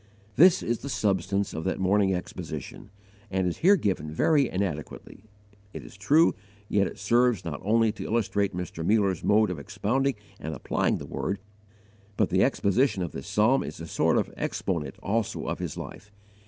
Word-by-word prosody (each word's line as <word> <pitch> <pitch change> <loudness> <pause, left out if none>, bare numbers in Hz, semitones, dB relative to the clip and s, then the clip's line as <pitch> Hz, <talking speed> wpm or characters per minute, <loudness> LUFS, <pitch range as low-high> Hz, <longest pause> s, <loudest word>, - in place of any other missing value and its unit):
This 175 +5 +6
is 120 0 -1
the 140 - -7
substance 100 -3 0
of 80 - -4
that 95 - -1
morning 95 +1 +3
exposition, 90 -1 -6 0.4
and 95 -1 0
is 90 - -1
here 195 +4 +6
given 95 - -1
very 140 - +3
inadequately, 90 +1 -5 0.5
it - - -7
is - - -13
true, 145 - +4 0.3
yet 100 -2 +2
it - - -9
serves 120 -3 +2
not 75 -4 -5
only 115 +2 +3
to 105 - -8
illustrate 100 -4 0
Mr. 85 -2 -5
Muller's 100 -2 +2
mode 105 -1 +3
of 85 - -5
expounding 105 - -1 0.2
and 80 +1 -5
applying - - 0
the - - -8
Word, 100 - -3 0.8
but - - +1
the - - +4
exposition 100 -1 +1
of 85 - -4
this 70 - -8
psalm 120 +6 +3
is - - -7
a 85 - -6
sort 80 - +1
of - - -1
exponent 75 -7 -3
also 110 +2 -1
of - - -3
his - - -5
life. 105 - -9
100 Hz, 175 wpm, -27 LUFS, 90-115 Hz, 0.8 s, This